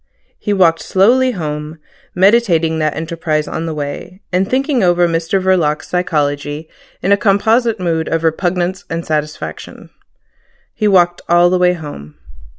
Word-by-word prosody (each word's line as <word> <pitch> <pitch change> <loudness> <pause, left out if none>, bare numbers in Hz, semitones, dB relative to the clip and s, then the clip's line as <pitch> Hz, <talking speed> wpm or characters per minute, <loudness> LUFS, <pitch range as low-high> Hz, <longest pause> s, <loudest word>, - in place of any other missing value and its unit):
He 210 - -3
walked 170 -5 +3
slowly 250 +7 +3
home, 150 -3 -5 0.4
meditating 180 -5 +3
that 155 -1 0
enterprise 160 -2 -2
on 165 +1 -4
the 160 - -3
way, 150 +5 -6
and 185 +2 +1
thinking 270 0 +1
over 175 -1 +3
Mr 165 +3 0
Verloc's 180 -5 0
psychology 150 -3 -2 0.4
in 195 - +1
a 200 - +5
composite 220 +3 +2
mood 165 -3 -1
of 165 0 -1
repugnance 175 +3 -1
and 165 +1 -4
satisfaction. 150 - -5 0.8
He 215 - 0
walked 175 -3 +3
all 175 +1 +4
the 185 - +2
way 180 0 +3
home. 145 - -9
175 Hz, 145 wpm, -16 LUFS, 155-190 Hz, 0.8 s, a